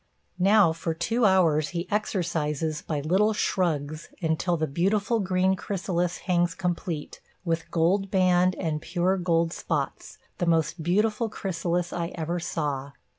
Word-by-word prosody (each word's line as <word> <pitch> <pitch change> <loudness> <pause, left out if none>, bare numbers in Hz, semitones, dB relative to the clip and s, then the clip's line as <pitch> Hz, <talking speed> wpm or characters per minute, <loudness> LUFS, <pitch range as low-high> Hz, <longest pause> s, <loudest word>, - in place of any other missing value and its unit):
Now 195 -2 +5
for 165 0 -3
two 225 +8 +1
hours 165 -6 +3
he 170 - -3
exercises 160 -7 -1
by 150 -3 -3
little 190 +8 +2
shrugs 155 -6 -1
until 165 +1 0
the 155 - 0
beautiful 200 - +1
green 185 -1 +2
chrysalis 180 -2 -2
hangs 175 -2 +1
complete, 175 -4 -3 0.2
with 165 -1 -1
gold 185 +4 +1
band 185 -1 +3
and 155 -4 -2
pure 180 +3 0
gold 170 -2 +1
spots, - - -3 0.2
the 175 - 0
most 165 0 +1
beautiful 210 +6 +1
chrysalis 175 -3 -2
I 170 -1 -2
ever 170 +1 -2
saw. 145 -4 -3
175 Hz, 135 wpm, -26 LUFS, 160-190 Hz, 0.2 s, Now